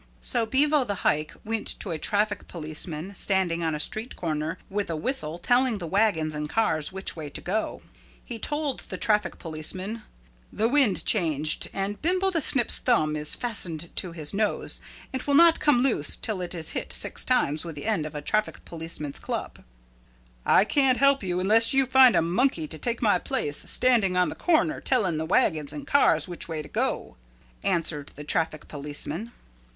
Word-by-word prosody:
So 220 Hz, -, -1 dB
Bevo 290 Hz, +3 st, +4 dB
the 200 Hz, -5 st, -5 dB
Hike 150 Hz, +1 st, +1 dB
went 225 Hz, 0 st, -2 dB
to 195 Hz, -, -5 dB
a 160 Hz, -, -3 dB
traffic 210 Hz, +3 st, 0 dB
policeman 155 Hz, +2 st, -5 dB
standing 185 Hz, -3 st, 0 dB
on 160 Hz, -2 st, 0 dB
a -, -, -5 dB
street 220 Hz, +9 st, -3 dB
corner 160 Hz, 0 st, -3 dB
with 205 Hz, -1 st, -3 dB
a 165 Hz, -, -2 dB
whistle 160 Hz, -, -1 dB
telling 245 Hz, +3 st, +2 dB
the 180 Hz, -, -6 dB
wagons 170 Hz, -4 st, +1 dB
and 150 Hz, 0 st, -4 dB
cars 155 Hz, -8 st, 0 dB
which 190 Hz, +1 st, -3 dB
way 155 Hz, -3 st, -6 dB
to -, -, -5 dB
go. 215 Hz, +5 st, -3 dB, 0.4 s
He 235 Hz, -3 st, -6 dB
told 295 Hz, +2 st, -2 dB
the -, -, -5 dB
traffic 210 Hz, -2 st, +1 dB
policeman, 185 Hz, +7 st, -3 dB, 0.5 s
"The 220 Hz, +2 st, 0 dB
wind 255 Hz, -6 st, +2 dB
changed 155 Hz, -7 st, +1 dB
and 195 Hz, +1 st, -4 dB
Bimbo 370 Hz, +4 st, +1 dB
the 330 Hz, -3 st, 0 dB
Snip's 255 Hz, -4 st, +4 dB
thumb 155 Hz, -12 st, +1 dB
is 150 Hz, 0 st, +2 dB
fastened 170 Hz, -9 st, -2 dB
to 180 Hz, -, -2 dB
his 155 Hz, -1 st, -4 dB
nose 210 Hz, +1 st, -1 dB, 0.3 s
and 260 Hz, -, -2 dB
will 285 Hz, +1 st, 0 dB
not 335 Hz, +2 st, +6 dB
come 275 Hz, -5 st, +3 dB
loose 225 Hz, -, +1 dB
till 210 Hz, -4 st, -3 dB
it 180 Hz, 0 st, -4 dB
is 160 Hz, -2 st, -2 dB
hit -, -, -4 dB
six -, -, +1 dB
times 155 Hz, -, +1 dB
with 165 Hz, -3 st, -7 dB
the 145 Hz, -, -7 dB
end 200 Hz, -9 st, 0 dB
of 155 Hz, -, -11 dB
a 145 Hz, -, -5 dB
traffic 215 Hz, +6 st, -1 dB
policeman's 160 Hz, -3 st, -5 dB
club." -, -, -5 dB, 0.8 s
"I 195 Hz, -, +5 dB
can't 265 Hz, +1 st, +2 dB
help 275 Hz, +2 st, +4 dB
you 180 Hz, -2 st, -2 dB
unless 225 Hz, +6 st, +4 dB
you 270 Hz, 0 st, +4 dB
find 260 Hz, -1 st, +6 dB
a -, -, +3 dB
monkey 175 Hz, -, 0 dB
to 155 Hz, -, -7 dB
take 235 Hz, 0 st, -2 dB
my 205 Hz, -5 st, +3 dB
place 145 Hz, -3 st, -1 dB
standing 225 Hz, -8 st, +3 dB
on 180 Hz, -, +3 dB
the -, -, -5 dB
corner 315 Hz, -2 st, +1 dB
telling 200 Hz, -11 st, 0 dB
the 160 Hz, -, -2 dB
wagons 155 Hz, -4 st, +2 dB
and 290 Hz, -, -7 dB
cars 165 Hz, -, +3 dB
which 175 Hz, -1 st, -3 dB
way 160 Hz, -2 st, -4 dB
to -, -, -10 dB
go," -, -, -2 dB, 0.5 s
answered 155 Hz, -4 st, -1 dB
the 150 Hz, -, -8 dB
traffic 155 Hz, 0 st, 0 dB
policeman. 150 Hz, +8 st, -4 dB
190 Hz, 190 wpm, -26 LUFS, 155-240 Hz, 0.8 s, not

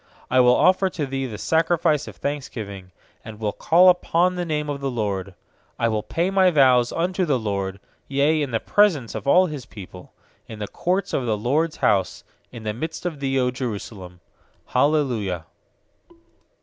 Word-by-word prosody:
17I 130 Hz, 0 st, +5 dB
will 125 Hz, 0 st, +5 dB
offer 185 Hz, +1 st, +3 dB
to 160 Hz, -5 st, -3 dB
Thee 135 Hz, 0 st, -3 dB
the 110 Hz, -4 st, -7 dB
sacrifice 165 Hz, -, +1 dB
of -, -, -9 dB
thanksgiving, 110 Hz, -10 st, -5 dB, 0.3 s
And 110 Hz, -1 st, -10 dB
will 105 Hz, -2 st, -1 dB
call 175 Hz, -, +4 dB
upon 180 Hz, 0 st, +3 dB
the 180 Hz, -1 st, -3 dB
name 150 Hz, -2 st, -2 dB
of 145 Hz, -1 st, -4 dB
the 135 Hz, -, -1 dB
LORD. 100 Hz, -6 st, -3 dB, 0.4 s
18I 115 Hz, -1 st, +1 dB
will 110 Hz, -1 st, -1 dB
pay 170 Hz, -, -1 dB
my 190 Hz, -1 st, +4 dB
vows 130 Hz, -6 st, +4 dB
unto 180 Hz, +2 st, -1 dB
the 145 Hz, -6 st, +1 dB
LORD, 100 Hz, -3 st, -3 dB, 0.3 s
Yea, 145 Hz, +3 st, +2 dB
in 145 Hz, -, -2 dB
the 115 Hz, -2 st, -1 dB
presence 170 Hz, -, +2 dB
of -, -, -6 dB
all 180 Hz, +6 st, +5 dB
His 145 Hz, -8 st, -7 dB
people; 90 Hz, -4 st, -12 dB, 0.4 s
19In 110 Hz, -, -8 dB
the 105 Hz, -1 st, -5 dB
courts 185 Hz, +3 st, -2 dB
of 125 Hz, -, -1 dB
the 110 Hz, -2 st, 0 dB
LORD'S 150 Hz, +9 st, 0 dB
house, 95 Hz, -4 st, +1 dB, 0.3 s
In 115 Hz, -3 st, -10 dB
the 105 Hz, -1 st, -2 dB
midst 160 Hz, +9 st, -6 dB
of 165 Hz, -5 st, -3 dB
thee, 135 Hz, -1 st, -1 dB
0 125 Hz, -1 st, +2 dB
Jerusalem. 100 Hz, -7 st, -6 dB, 0.4 s
Hallelujah. 120 Hz, -, 0 dB
135 Hz, 175 wpm, -23 LUFS, 110-160 Hz, 0.4 s, 17I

